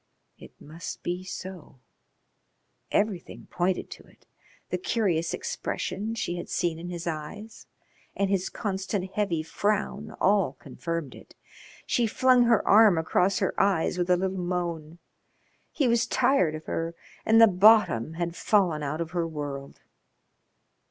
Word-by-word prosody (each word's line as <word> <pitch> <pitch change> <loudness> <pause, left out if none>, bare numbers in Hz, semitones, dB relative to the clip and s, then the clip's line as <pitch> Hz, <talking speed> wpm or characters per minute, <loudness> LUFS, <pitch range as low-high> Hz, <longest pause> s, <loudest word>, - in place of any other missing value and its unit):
It - - -15
must 160 +3 -8
be 180 +1 -3
so. 185 -7 -9 1.1
Everything 205 -4 -1
pointed 180 +1 -1
to - - -10
it; - - -24 0.5
the - - -1
curious 190 - 0
expression 225 - -3
she 175 -5 -3
had 175 - -7
seen 165 -2 -1
in 175 +1 -7
his 175 -1 -6
eyes 170 +7 -6 0.5
and 200 - +1
his 190 -1 0
constant 190 -2 -3
heavy 185 -7 -1
frown 205 +5 -1
all 200 0 +3
confirmed 165 -5 -5
it. - - -15 0.5
She 240 -2 +1
flung 250 +2 +4
her 230 -3 +3
arm 210 -3 +7
across 180 +4 +1
her 190 - 0
eyes 190 -2 +1
with 175 0 -1
a 180 - +5
little 190 +1 -2
moan. 170 -3 -3 0.7
He 280 - +1
was 235 -1 +2
tired 185 - +2
of 155 - -9
her 165 +1 -3 0.3
and 225 +1 +5
the 225 - +10
bottom 195 - +4
had 170 0 -3
fallen 180 -8 +2
out 150 +3 -3
of 160 -1 -4
her 170 -2 -1
world. 145 -3 -6
180 Hz, 145 wpm, -27 LUFS, 165-210 Hz, 1.1 s, the